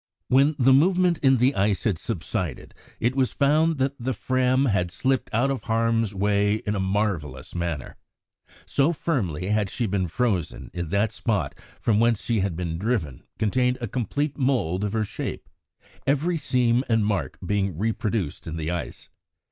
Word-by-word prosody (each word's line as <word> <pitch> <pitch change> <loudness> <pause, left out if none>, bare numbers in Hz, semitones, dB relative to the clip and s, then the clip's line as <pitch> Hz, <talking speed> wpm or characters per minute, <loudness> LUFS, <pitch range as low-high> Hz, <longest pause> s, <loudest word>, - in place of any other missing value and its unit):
When 140 +4 +4
the 135 -1 +5
movement 180 +3 +4
in 135 -2 +4
the 125 +4 +3
ice 100 -2 +1
had 100 -8 0
subsided, - - -4 0.3
it 120 +3 +1
was 130 -2 +1
found 155 +3 +3
that 135 +1 +1
the 125 +1 -2
Fram 130 +4 +2
had 95 -7 +1
slipped 130 +8 -1
out 120 +5 +2
of 135 - -4
harm's 115 -1 +1
way 100 +1 +2
in 105 -1 -3
a 100 - -1
marvellous 95 -9 -2
manner. 85 -5 -4 0.7
So 145 +4 +2
firmly 100 - -2
had 105 -2 +1
she 120 - -2
been 95 -3 0
frozen 95 -3 -2
in 85 -2 -4
that 100 +4 +2
the - - -11
spot 105 -4 -1 0.3
from 110 -2 +2
whence 115 -3 +2
she 115 +1 0
had 95 -3 -1
been 85 -1 -3
driven 95 - -1 0.2
contained 125 +3 +1
a 120 - -3
complete 140 +7 -2
mould 115 - +1
of 105 0 -2
her 110 -1 +1
shape, - - -5 0.6
every 150 +6 +2
seam 125 -5 +2
and 110 -2 +3
mark 105 -2 -1
being 95 -3 0
reproduced 105 -5 -2
in 80 0 -4
the 80 +1 -2
ice. 85 -3 -5
110 Hz, 170 wpm, -25 LUFS, 95-130 Hz, 0.7 s, the